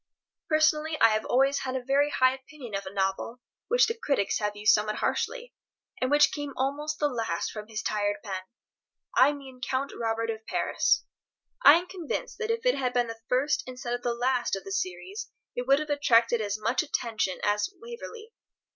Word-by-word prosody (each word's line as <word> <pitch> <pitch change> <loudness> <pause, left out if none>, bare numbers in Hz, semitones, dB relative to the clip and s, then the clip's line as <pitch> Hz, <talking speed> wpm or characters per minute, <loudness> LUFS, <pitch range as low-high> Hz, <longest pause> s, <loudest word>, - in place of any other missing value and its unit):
Personally, 310 0 +2
I - - +7
have 215 0 0
always 275 +2 +3
had 260 -1 -3
a 260 - -2
very 280 +3 +2
high 255 -2 +3
opinion 265 -3 -11
of 195 -1 -3
a - - -6
novel 195 +5 -2 0.3
which - - +5
the 455 - -1
critics 280 - 0
have 210 -1 -2
used 210 0 +4
somewhat 215 0 +1
harshly, - - -2 0.5
and 255 - +1
which 295 +1 +5
came 290 -2 -5
almost 290 +4 -1
the 295 - +2
last 225 -10 -2
from 215 -1 -7
his 220 -1 -5
tired 205 -1 0
pen. 190 -3 -4 0.7
I 270 +3 +6
mean 270 -3 -10
"Count 260 +3 -2
Robert 230 0 -1
of 220 0 -7
Paris." - - +1 0.6
I 285 +3 +10
am 345 +2 0
convinced 360 -4 -5
that 445 -1 -2
if 460 +1 -1
it - - +5
had 255 -2 -1
been 245 -1 +2
the 225 0 -7
first, 260 +4 +2
instead 250 -1 -5
of 245 - -2
the 240 -1 -1
last, 245 -2 +1
of 195 - -7
the 390 - -8
series 380 +2 -4 0.3
it 245 +1 -3
would 275 +1 +6
have 305 0 -3
attracted 240 -5 +3
as 205 0 -2
much 230 +9 +1
attention 230 - -2
as 205 0 +1
"Waverley." 465 -1 -9
255 Hz, 195 wpm, -28 LUFS, 225-300 Hz, 0.7 s, I